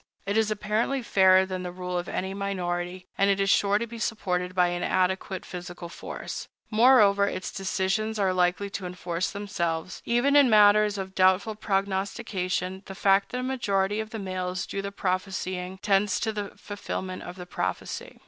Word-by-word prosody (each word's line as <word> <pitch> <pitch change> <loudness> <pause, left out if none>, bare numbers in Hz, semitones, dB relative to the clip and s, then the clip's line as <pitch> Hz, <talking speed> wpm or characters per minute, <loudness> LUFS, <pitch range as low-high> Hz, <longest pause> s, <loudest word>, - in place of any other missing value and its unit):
It 200 +1 -1
is 220 -1 +3
apparently 215 +5 -1
fairer 190 -3 +5
than 185 -1 -4
the 180 -1 -5
rule 180 0 -5
of 175 0 -2
any 190 +1 -3
minority, 180 -2 -3
and 195 +1 +4
it 200 0 +2
is 195 0 +3
sure 200 0 +3
to 230 - -2
be 230 0 -9
supported 180 -5 -2
by 180 -1 +4
an 175 0 -3
adequate 185 0 0
physical 175 -1 -7
force. - - -7 0.2
Moreover, 215 -4 +5
its 185 - -4
decisions 195 +3 -1
are 195 -2 +2
likely 180 +2 +1
to 190 -2 -4
enforce 180 0 -3
themselves. 180 -4 -3
Even 245 +4 +2
in 285 -2 +7
maters 210 -1 +5
of 190 -1 -5
doubtful 190 +3 +3
prognostication, 195 -2 -2
the 195 - -7
fact 195 0 +3
that 250 - -3
a - - -4
majority 205 -6 0
of 220 0 -4
the 225 - -6
males 185 -2 -3
do 195 - -4
the 200 0 -5
prophesying 185 -1 -3
tends 200 -1 +2
to 220 - 0
the 205 -1 -4
fulfillment 190 -2 -5
of 175 - -8
the 180 -1 -8
prophecy. - - -4
195 Hz, 175 wpm, -27 LUFS, 185-210 Hz, 0.2 s, in